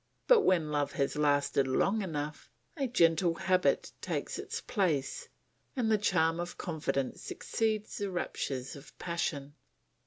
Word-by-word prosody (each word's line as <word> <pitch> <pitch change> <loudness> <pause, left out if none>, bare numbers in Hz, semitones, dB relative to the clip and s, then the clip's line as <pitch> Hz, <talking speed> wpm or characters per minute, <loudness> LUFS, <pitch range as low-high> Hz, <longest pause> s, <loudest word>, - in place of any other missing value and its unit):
But - - +7
when 165 - +2
love 145 -1 0
has 140 0 0
lasted 145 -2 +2
long 195 +11 +2
enough, 150 -5 -4 0.3
a 275 -4 -1
gentle 170 -6 +3
habit 185 0 +2
takes - - -3
its - - -4
place 165 - -1 0.5
and 235 -4 +1
the 215 - +4
charm 165 -4 +2
of 175 0 -4
confidence 140 -6 -2
succeeds 215 -2 -2
the 200 -1 -1
raptures 135 -7 -3
of 140 +1 -13
passion. 145 -5 -3
165 Hz, 135 wpm, -31 LUFS, 145-195 Hz, 0.5 s, But